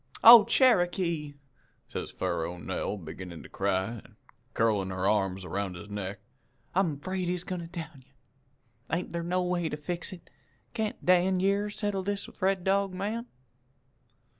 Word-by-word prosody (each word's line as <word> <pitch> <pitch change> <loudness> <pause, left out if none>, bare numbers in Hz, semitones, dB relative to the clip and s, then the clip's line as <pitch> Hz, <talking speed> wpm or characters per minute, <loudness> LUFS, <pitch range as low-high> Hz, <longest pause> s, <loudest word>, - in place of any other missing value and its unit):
"'Oh, 230 -2 +11
Cherokee!' 175 - +2 0.5
says - - -5
Faro 85 +2 -2
Nell, 95 +4 -3
beginnin' 85 0 -8
to - - -12
cry, 95 +3 -1
an' - - -20 0.4
curlin' 105 -4 +2
her 95 0 -1
arms 95 -3 +1
'round 95 +1 -3
his 100 +4 -10
neck. 100 0 -4 0.6
'I'm 170 -6 +1
'fraid 185 +2 -3
he's 180 0 -1
goin' 180 -1 -4
to 165 - -7
down 165 -6 -8
you. 135 - -32 0.8
Ain't 170 +3 -1
thar 170 - -1
no 180 +2 0
way 175 -2 0
to 150 - -4
fix 175 +5 -3
it? 180 -3 -11 0.5
Can't 220 -3 -3
Dan 185 +1 +4
yere 200 +2 +1
settle 205 -2 -2
with 190 - -10
this 205 0 -3
Red 190 -1 +2
Dog 195 0 +1
man?' 215 +5 -3
175 Hz, 160 wpm, -29 LUFS, -, 0.8 s, Oh